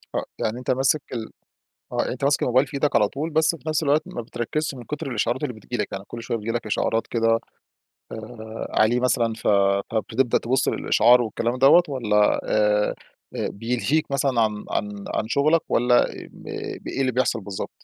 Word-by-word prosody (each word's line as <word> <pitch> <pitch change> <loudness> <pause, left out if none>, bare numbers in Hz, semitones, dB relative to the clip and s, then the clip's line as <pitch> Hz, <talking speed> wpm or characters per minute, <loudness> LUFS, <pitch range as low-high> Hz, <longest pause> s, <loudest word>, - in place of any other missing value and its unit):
آه، - - -1
يعني 115 +3 -2
أنتَ 125 - -2
ماسك 135 +3 +2
ال 115 -2 -5 0.6
آه - - -4
يعني - - -1
أنتَ 130 +2 -4
ماسك 145 0 +2
الموبايل 130 +3 +3
في 135 - -13
إيدك 145 +1 +1
على 105 -2 +4
طول، 155 +7 -4
بس 160 +2 +2
في 155 - -6
نفْس 155 0 +1
الوقت 150 +1 +3
ما 120 - -6
بتركّزش 125 +6 -3
من 125 - -9
كتر 150 +2 -5
الإشعارات 120 +3 -1
اللي 125 -5 -2
بتيجي 110 +3 -6
لك، 105 -3 -2
يعني 95 0 -5
كل 115 0 -7
شوية 115 - -2
بتيجي 110 +2 -3
لك 120 -2 -3
إشعارات 115 +2 0
كده، 115 -1 +2 0.7
آآ 110 0 -7
عليه 120 +3 +4
مثلًا، 120 -2 +1
فب 100 -2 +2 0.3
بتبدأ 120 +1 +2
تبُص 130 +2 0
للإشعار 120 +3 +4
والكلام 115 +2 -2
دوّة، 140 +7 +7
والّا 105 -7 +2
آآ 105 -1 +2 0.4
بيلهيك 125 +8 -1
مثلًا 135 -3 +1
عن 105 -1 0
عن 100 -1 -3
عن 110 - -1
شغلك، 155 +6 +3
والّا 120 +1 +3
ا - - -10
م - - -14 0.4
إيه - - -2
اللي 130 -1 +1
بيحصل 120 -3 0
بالضبط؟ 95 -1 -5
120 Hz, 190 wpm, -23 LUFS, 110-135 Hz, 0.7 s, دوّة